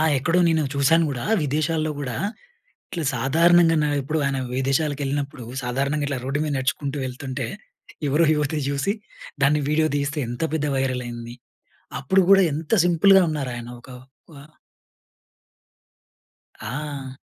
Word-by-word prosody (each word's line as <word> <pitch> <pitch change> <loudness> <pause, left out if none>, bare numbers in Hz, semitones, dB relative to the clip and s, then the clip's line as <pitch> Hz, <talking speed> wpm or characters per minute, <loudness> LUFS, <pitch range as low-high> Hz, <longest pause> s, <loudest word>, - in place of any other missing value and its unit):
ఆ! - - +3 0.2
ఎక్కడో, 165 +6 +1
నేను 160 -1 +2
చూసాను 155 +4 +4
గూడా. 125 -3 -4 0.2
విదేశాల్లో 155 +2 0
గూడా, 130 -4 -4 0.7
ఇట్లా 170 -3 -4
సాధారణంగా 165 +6 +4
నా 150 - +1
ఎప్పుడు, 155 +4 -2
ఆయన 135 -1 -1 0.2
విదేశాలకెళ్ళినప్పుడు 140 -1 -1 0.2
సాధారణంగా, 140 +4 -1
ఇట్లా 140 -3 -2
రోడ్డు 135 +3 -1
మీద 145 - -2
నడుచుకుంటూ 135 +2 -2
వెళ్తుంటే, 130 0 -5 0.6
ఎవరో 155 +4 +3
యువతి 150 +1 -1
చూసి 140 +8 0 0.5
దాన్ని 150 +2 +3
వీడియో 155 +1 +2
తీస్తే, 145 +2 -2
ఎంత 120 +6 -4
పెద్ద 150 -2 0
వైరల్ 130 -2 -1
అయింది. 120 0 -7 0.7
అప్పుడు 190 +8 +3
గూడా 195 -1 +7
ఎంత 155 +4 -6
సింపుల్‌గా 190 +3 +5
ఉన్నారు. 140 -4 -3
ఆయన 120 0 -7
ఒక 130 - -15 0.4
వా 140 -2 -12 2.2
ఆ! 135 +2 -5
145 Hz, 130 wpm, -23 LUFS, 135-155 Hz, 2.2 s, గూడా